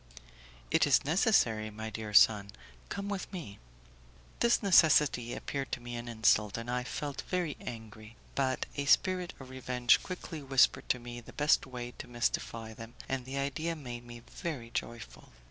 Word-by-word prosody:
"It -, -, +4 dB
is -, -, +4 dB
necessary, 140 Hz, -, +3 dB
my 110 Hz, +1 st, -6 dB
dear 110 Hz, -1 st, -5 dB
son; 105 Hz, -1 st, +6 dB, 0.4 s
come 200 Hz, 0 st, -4 dB
with 200 Hz, -2 st, -4 dB
me." 165 Hz, -, -7 dB, 0.8 s
This 235 Hz, -1 st, +3 dB
necessity 150 Hz, -10 st, +5 dB
appeared 135 Hz, -1 st, -4 dB
to -, -, -1 dB
me 120 Hz, 0 st, -7 dB
an 120 Hz, 0 st, -6 dB
insult, 110 Hz, -2 st, +2 dB
and 115 Hz, +1 st, -4 dB
I 125 Hz, 0 st, -1 dB
felt 145 Hz, +2 st, -4 dB
very 175 Hz, -5 st, -1 dB
angry; 110 Hz, -1 st, -9 dB, 0.2 s
but 130 Hz, -1 st, 0 dB
a 140 Hz, -, -2 dB
spirit 180 Hz, +5 st, +3 dB
of 130 Hz, -1 st, -11 dB
revenge 125 Hz, -2 st, +2 dB
quickly 180 Hz, -3 st, -6 dB
whispered 135 Hz, -2 st, +3 dB
to -, -, +3 dB
me 120 Hz, 0 st, -8 dB
the -, -, -14 dB
best 150 Hz, -1 st, +3 dB
way 120 Hz, -1 st, -6 dB
to -, -, -7 dB
mystify 115 Hz, -1 st, -2 dB
them, 115 Hz, +2 st, -11 dB
and 130 Hz, -2 st, -2 dB
the 135 Hz, +1 st, -5 dB
idea 140 Hz, +4 st, -2 dB
made 120 Hz, -5 st, -7 dB
me 120 Hz, -1 st, -11 dB
very 130 Hz, -9 st, -6 dB
joyful. 115 Hz, -3 st, -6 dB
125 Hz, 165 wpm, -31 LUFS, 115-150 Hz, 0.8 s, son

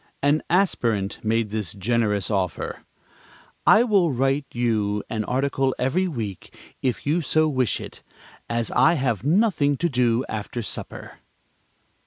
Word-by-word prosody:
An 145 Hz, +2 st, +3 dB
aspirant 115 Hz, -, +1 dB
made 110 Hz, -1 st, 0 dB
this 105 Hz, -5 st, -3 dB
generous 105 Hz, -1 st, 0 dB
offer: 95 Hz, -4 st, -2 dB, 0.9 s
"I 220 Hz, -, +7 dB
will 200 Hz, -9 st, +3 dB
write 135 Hz, +2 st, 0 dB
you 105 Hz, -4 st, 0 dB
an 110 Hz, -1 st, -1 dB
article 135 Hz, +1 st, 0 dB
every 150 Hz, +9 st, +1 dB
week 110 Hz, -, -6 dB, 0.2 s
if 130 Hz, -3 st, -2 dB
you 155 Hz, +5 st, +1 dB
so 155 Hz, +1 st, +2 dB
wish 130 Hz, -5 st, 0 dB
it, -, -, -10 dB, 0.5 s
as 115 Hz, -1 st, -1 dB
I 130 Hz, +6 st, +4 dB
have 125 Hz, -, -1 dB
nothing 150 Hz, -, +2 dB
to 170 Hz, +3 st, 0 dB
do 125 Hz, -2 st, +1 dB
after 110 Hz, +2 st, -4 dB
supper." -, -, -6 dB
125 Hz, 135 wpm, -23 LUFS, 110-145 Hz, 0.9 s, I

